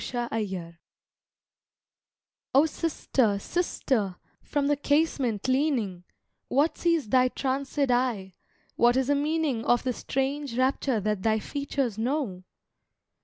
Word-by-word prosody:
The 240 -1 -2
Vision 185 -6 -4 1.8
"O 280 +3 +7
SISTER, 275 -9 0
sister, 225 - -1 0.3
from 290 -1 -1
the 290 +1 +3
casement 280 -7 0
leaning, 255 - 0 0.4
What 300 +4 +2
sees 335 -7 +1
thy 255 +3 +4
tranced 270 +2 -3
eye, 245 -8 +1 0.4
what 240 +1 +4
is 265 0 +1
the 285 - +4
meaning 295 -4 0
Of 240 0 +2
the 255 - 0
strange 270 0 -2
rapture 260 -2 +1
that 210 -1 -1
thy 220 +1 +2
features 270 -2 -3
know?" 235 -7 -2
255 Hz, 120 wpm, -27 LUFS, 220-285 Hz, 1.8 s, O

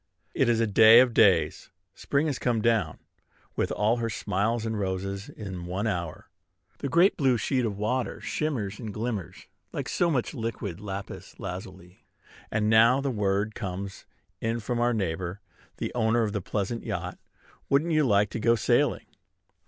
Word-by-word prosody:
It - - +2
is 115 -1 +2
a 115 - +3
day 110 +2 +8
of 125 -2 +4
days. 95 -6 +3 0.2
Spring 140 +2 0
has 145 -5 -2
come 120 -3 +1
down 110 -8 +1 0.6
with - - -1
all 110 +3 +1
her 115 -1 -2
smiles 105 +2 -1
and 110 -1 -2
roses 100 +1 -3
in 95 -4 -7
one 95 +4 -2
hour. 85 -7 -3 0.5
The 140 - -3
great 170 +8 +4
blue 130 -4 +3
sheet 125 +2 0
of 105 -3 -3
water 125 +5 -1
shimmers 115 -10 -3
and 110 -4 -5
glitters 110 -4 -4 0.3
like - - -4
so 175 - +1
much 130 -7 -1
liquid 110 - -4
lapis 100 -1 -7
lazuli; 90 0 -8 0.5
and 105 -1 0
now 115 +4 +5
the 140 -1 -1
word 105 -1 0
comes 95 -2 -6 0.3
in 115 +1 -1
from 120 +2 -2
our 120 +1 +2
neighbor, 90 -1 -3 0.4
the - - -4
owner 115 0 +2
of 105 -2 -2
the 105 - -2
pleasure 100 +5 -2
yacht, - - -5 0.5
"Wouldn't 150 +5 +2
you 155 -1 +3
like 105 -5 +3
to - - -4
go 115 +1 +3
sailing?" 110 - +1
110 Hz, 170 wpm, -27 LUFS, 100-120 Hz, 0.6 s, day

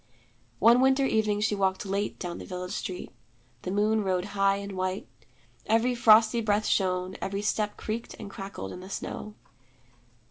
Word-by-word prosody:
One 235 +3 +6
winter 265 +1 +4
evening 215 -4 +1
she 215 0 +1
walked 190 -1 0
late 200 +1 -2
down 175 -1 -5
the - - -8
village 180 0 -5
street. 185 -3 -5 0.5
The - - -5
moon 210 +2 +2
rode 185 -1 0
high 195 0 +3
and 200 0 -5
white. 185 0 -3 0.6
Every 230 +3 +3
frosty 230 0 +5
breath 210 -1 +1
shone, 185 -1 0
every 200 +1 -3
step 210 0 -1
creaked 225 +2 -5
and 215 - -8
crackled 195 - -7
in - - -8
the 185 +1 -10
snow. 210 +1 -5
205 Hz, 165 wpm, -28 LUFS, 190-220 Hz, 0.6 s, One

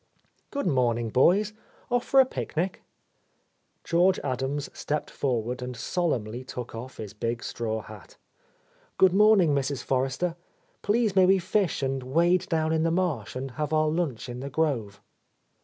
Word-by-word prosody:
"Good 280 - -3
morning, 120 -7 +1
boys. 195 - +3 0.4
Off 245 0 +2
for 270 - +4
a 265 - +8
picnic?" 185 -6 -3 1.0
George 180 +3 +3
Adams 135 +2 -2
stepped 150 0 -3
forward 125 -2 -2
and 125 -1 -5
solemnly 125 - -2
took 125 -2 -7
off 125 +3 -8
his 105 -2 -7
big 115 +2 -3
straw 110 -2 -3
hat. 110 -2 -13 0.8
"Good 190 -1 +5
morning, 200 -6 +5
Mrs. 140 -1 -1
Forrester. 135 +6 -1 0.5
Please 215 -1 +1
may 185 -1 +6
we 195 +1 +5
fish 185 -4 0
and 135 0 -1
wade 170 +8 +2
down 160 -1 +1
in 160 - +1
the 165 - +2
marsh 175 -5 -1
and 130 +1 -4
have 150 +3 -3
our 155 0 +3
lunch 155 -8 -2
in 120 0 -6
the 140 +2 -5
grove 130 -10 -1
145 Hz, 155 wpm, -27 LUFS, 125-180 Hz, 1.0 s, a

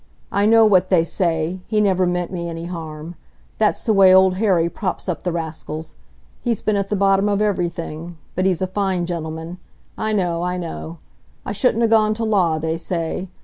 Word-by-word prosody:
I 200 +1 +2
know 225 0 +6
what 190 -3 +4
they 175 -4 +4
say, 165 0 -1
he 215 - +1
never 190 -3 +2
meant 180 0 -2
me 170 -2 -4
any 165 0 -6
harm. 165 -2 -7 0.5
That's 215 -1 +1
the 220 - +2
way 195 -2 +7
Old 190 0 +5
Harry 185 -6 +2
props 185 +2 -4
up 180 - -2
the 180 - -2
rascals. 160 -1 -5 0.5
He's 235 -4 -1
been 215 - 0
at 200 -1 -1
the 210 - 0
bottom 195 +1 +3
of 200 -1 +1
everything; 175 -4 -2 0.2
but 185 +1 +1
he's 185 -1 0
a - - +2
fine 185 -2 -1
gentleman,—I 170 +5 -6
know, 175 -4 0
I 180 +1 -2
know. 170 -1 -6 0.5
I - - -3
shouldn't 230 +3 +2
ha' - - +1
gone 215 -1 +4
to 230 - -3
law, 185 -7 +2
they 160 +1 -2
say. 170 +2 -3
180 Hz, 190 wpm, -21 LUFS, 170-200 Hz, 0.5 s, way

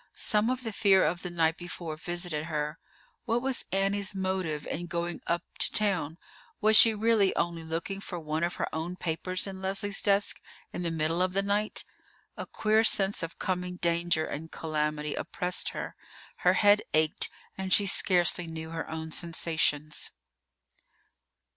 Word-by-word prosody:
Some 210 +2 +4
of 255 0 -2
the 225 -2 -4
fear 195 -3 +4
of 175 +2 -1
the 180 - -4
night 165 -1 +1
before 175 -2 -6
visited 175 -1 -1
her. 150 -1 -3 0.5
What 235 0 +1
was 265 -1 0
Annie's 195 +1 +1
motive 185 -6 -2
in 175 +2 -4
going 170 0 -3
up 170 +1 0 0.2
to - - +3
town? 180 -7 +1 0.4
Was 215 +1 +4
she 225 0 +9
really 215 -2 +3
only 170 -1 -1
looking 165 +5 -4
for 180 -3 -6
one 155 +1 -2
of 175 - -1
her - - -2
own 165 +3 -3
papers 185 +2 -2
in 190 -1 -7
Leslie's 195 +1 -1
desk 200 0 +1 0.3
in - - -4
the 170 - -1
middle 165 +1 0
of 185 0 +1
the 195 +1 +1
night? 205 +1 0 0.5
A - - -6
queer 220 +1 +2
sense 200 -2 +3
of 165 -1 -5
coming 180 -1 -2
danger 170 -2 +1
and 160 +3 -6
calamity 150 -1 -2
oppressed 180 0 -2
her. - - -6 0.4
Her - - +3
head 205 0 +5
ached, 155 0 +2 0.3
and 190 0 -5
she 205 - +5
scarcely 180 -2 +2
knew 160 0 -6
her 165 0 -5
own 160 0 -5
sensations. 155 -3 0
175 Hz, 165 wpm, -29 LUFS, 160-195 Hz, 0.5 s, she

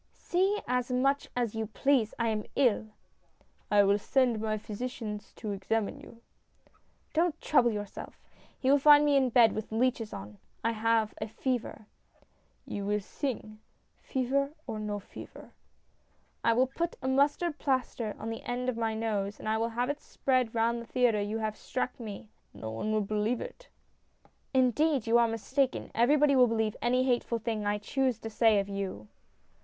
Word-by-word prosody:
" - - -42
See 385 +4 +1
as 250 0 0
much 275 +3 +1
as 240 -3 0
you 220 -1 -3
please. 245 0 +1
I 235 -1 +1
am 215 -1 -2
ill! 235 -5 +2 0.3
" - - -40
" - - -37
I - - +8
will 200 +1 +3
send 245 -1 +1
my 215 -1 -1
physician 215 0 -5
to 215 - -5
examine 205 +2 -2
you." 230 0 -14 0.9
"Don't 330 0 +1
trouble 250 -5 +3
yourself. 205 -2 -6 0.4
He 265 0 +2
will 285 - +5
find 295 +1 +7
me 290 -1 +3
in 265 -2 +4
bed 230 -2 +6
with 215 0 -5
leeches 230 -1 0
on. 100 +1 -9 0.2
I 230 - +2
have 225 -1 +1
a 215 - -2
fever." 240 -1 -3 0.4
" - - -40
You 200 - -3
will 210 +1 0
sing, 215 0 -5 0.4
fever 275 +2 0
or 215 - -4
no 210 -1 -3
fever." 200 - -11 0.5
" - - -40
I 230 - +4
will 250 +3 +4
put 340 0 -1
a - - -1
mustard 290 +4 +1
plaster 255 -5 -1
on 225 +1 -5
the 225 - -5
end 250 +1 -2
of 240 - -3
my 225 -1 -1
nose, 210 -2 -2
and - - -7
I 220 0 +1
will 230 +1 0
have 240 +2 -1
it 290 - -8
spread 255 -4 0
round 230 +1 +1
the 235 - -11
theatre 245 -4 +2
that 205 - -4
you 220 +1 -2
struck 255 +4 -4
me! 215 -2 -7
" - - -42
"No 110 - -6
one 115 - -3
wiU 215 -1 +1
believe 215 +4 0
it." - - -9 0.4
" - - -35
Indeed, 270 +1 +2
you 235 +1 +4
are 235 - +4
mistaken. 255 +4 -1
Everybody 280 +4 +4
will 250 -1 +6
believe 220 -2 0
any 250 +1 +2
hateful 245 -2 +1
thing 220 -2 -3
I 205 0 +1
choose 255 +3 0
to 225 - -6
say 220 -1 +4
of 195 - -2
you." 195 - -5
230 Hz, 190 wpm, -30 LUFS, 215-260 Hz, 0.9 s, I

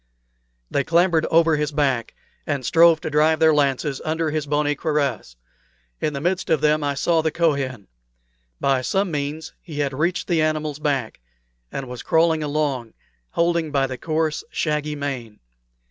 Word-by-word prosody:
They 140 - +1
clambered 170 0 +2
over 165 -1 +4
his 150 0 -1
back, 135 -5 0 0.3
and 140 -4 -2
strove 165 +3 +5
to 160 - -4
drive 155 +1 +3
their 160 -1 +5
lances 140 -1 0
under 160 0 -1
his 150 -1 -2
bony 150 0 +1
cuirass. 140 - -2 0.6
In 150 - -1
the 140 - -3
midst 175 +4 -1
of 160 - +3
them 150 +1 +2
I 145 -1 -1
saw 165 +3 +2
the 160 - +1
Kohen. 140 - -1 0.7
By 135 -2 +2
some 190 +7 0
means 150 +2 -4
he 155 -4 -9
had 140 -2 -1
reached 170 +6 -1
the 165 -3 +2
animal's 155 -1 -1
back, 140 -6 -2 0.5
and 135 - -5
was 125 -1 -7
crawling 160 -1 +2
along, 145 -6 -2 0.3
holding 170 -1 +1
by 140 -2 +1
the 130 -2 -6
coarse 155 0 -1
shaggy 150 -1 -1
mane. 130 -7 -5
150 Hz, 160 wpm, -22 LUFS, 140-160 Hz, 0.7 s, strove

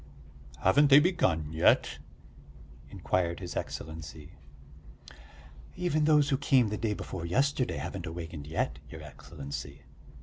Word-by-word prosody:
"Haven't 145 +10 +5
they 140 +1 +8
begun 95 - +1
yet?" 80 - +3 0.9
inquired 85 -2 -1
his 90 -3 -7
Excellency. 80 0 -6 1.4
"Even 155 -4 0
those 150 -2 +4
who 135 - +2
came 130 -5 +3
the 105 - -2
day 110 -2 -1
before 90 -3 -6
yesterday 130 +9 0
haven't - - -5
awakened 80 -3 -7
yet, 75 -4 -2
your 80 -1 -10
Excellency. 70 -1 -8
85 Hz, 115 wpm, -29 LUFS, -, 1.4 s, they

